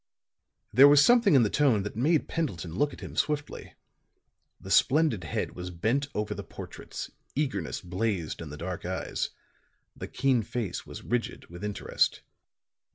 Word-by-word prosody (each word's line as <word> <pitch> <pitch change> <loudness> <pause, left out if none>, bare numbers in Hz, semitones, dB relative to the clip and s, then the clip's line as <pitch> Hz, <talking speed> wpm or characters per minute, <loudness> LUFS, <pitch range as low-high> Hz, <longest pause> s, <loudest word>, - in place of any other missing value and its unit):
There 135 +5 +9
was 145 0 +7
something 235 -8 +5
in 130 - +6
the 105 - +2
tone 130 -9 +3
that 105 - -6
made 150 +7 +2
Pendleton 90 - -3
look 145 - +1
at - - -11
him - - -8
swiftly. 150 -1 -2 0.8
The 95 - -9
splendid 135 - +3
head 80 - -2
was 90 0 -6
bent 110 +11 0
over 105 0 -1
the 100 0 -6
portraits; - - -8 0.2
eagerness 130 - -2
blazed 90 -3 -2
in 80 - -7
the 75 - -8
dark 90 +2 -5
eyes; 95 +1 -2 0.7
the - - -6
keen 130 -3 +2
face 110 -2 -4
was - - -9
rigid 120 0 -3
with 85 +3 -9
interest. 105 -1 0
110 Hz, 160 wpm, -28 LUFS, 90-140 Hz, 0.8 s, There